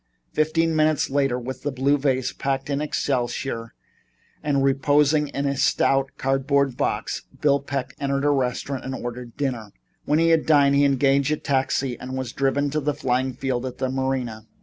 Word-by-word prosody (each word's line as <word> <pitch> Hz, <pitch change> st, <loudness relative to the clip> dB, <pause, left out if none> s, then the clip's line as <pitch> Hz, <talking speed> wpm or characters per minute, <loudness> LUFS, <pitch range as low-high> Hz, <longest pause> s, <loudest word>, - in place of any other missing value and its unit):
Fifteen 160 Hz, +1 st, +1 dB
minutes 155 Hz, -2 st, +2 dB
later, 135 Hz, -3 st, +1 dB
with 130 Hz, +1 st, -6 dB
the 145 Hz, -, -2 dB
blue 135 Hz, +2 st, +2 dB
vase 130 Hz, -3 st, 0 dB
packed 135 Hz, +1 st, -2 dB
in 140 Hz, +1 st, 0 dB
excelsior 125 Hz, -5 st, -2 dB, 0.7 s
and 140 Hz, -2 st, +1 dB
reposing 145 Hz, +2 st, +3 dB
in 140 Hz, 0 st, -3 dB
a 140 Hz, 0 st, 0 dB
stout 135 Hz, 0 st, +2 dB
cardboard 135 Hz, 0 st, +1 dB
box, 125 Hz, -4 st, -2 dB, 0.2 s
Bill 140 Hz, -2 st, +3 dB
Peck 135 Hz, -2 st, -4 dB
entered 140 Hz, 0 st, -1 dB
a 145 Hz, -, +4 dB
restaurant 135 Hz, 0 st, -1 dB
and 130 Hz, 0 st, -4 dB
ordered 120 Hz, -1 st, -7 dB
dinner. 125 Hz, -7 st, -3 dB, 0.3 s
When 150 Hz, -, +2 dB
he 165 Hz, +1 st, +3 dB
had 165 Hz, -1 st, +3 dB
dined 140 Hz, -3 st, +5 dB
he 140 Hz, 0 st, +4 dB
engaged 140 Hz, 0 st, +3 dB
a 155 Hz, -, +1 dB
taxi 135 Hz, -3 st, -1 dB
and 130 Hz, +1 st, -5 dB
was 130 Hz, -2 st, -4 dB
driven 140 Hz, +1 st, 0 dB
to 155 Hz, -, 0 dB
the 150 Hz, 0 st, -1 dB
flying 130 Hz, -1 st, 0 dB
field 130 Hz, -1 st, -2 dB
at 130 Hz, -1 st, -5 dB
the 130 Hz, -1 st, -1 dB
Marina. 130 Hz, -4 st, -2 dB
135 Hz, 175 wpm, -23 LUFS, 130-145 Hz, 0.7 s, dined